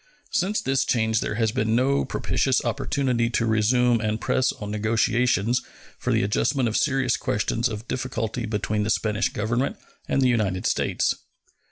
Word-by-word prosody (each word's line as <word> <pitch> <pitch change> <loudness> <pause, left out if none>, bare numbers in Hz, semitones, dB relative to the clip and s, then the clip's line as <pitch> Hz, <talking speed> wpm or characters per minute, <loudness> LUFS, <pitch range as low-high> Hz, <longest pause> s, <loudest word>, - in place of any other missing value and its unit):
Since 195 +4 0
this 135 0 +1
change 110 -3 +1
there - - -2
has 110 -1 +1
been 110 -2 0
no 135 +3 +2
propitious - - 0
opportunity 125 -4 0
to 120 -1 0
resume 115 +2 +2
and 110 0 -1
press 130 +3 +1
on 105 -1 -7
negotiations 115 +2 +1 0.4
for - - -1
the - - +2
adjustment 120 +5 +1
of 110 - -2
serious 135 -4 +2
questions 120 0 -1
of 110 +1 -7
difficulty 120 -2 -3
between 105 0 -1
the 105 - -1
Spanish 105 -1 +1
Government 120 +5 -1 0.3
and - - +1
the 130 - +4
United 105 -7 0
States. - - +1
115 Hz, 160 wpm, -24 LUFS, 110-130 Hz, 0.4 s, the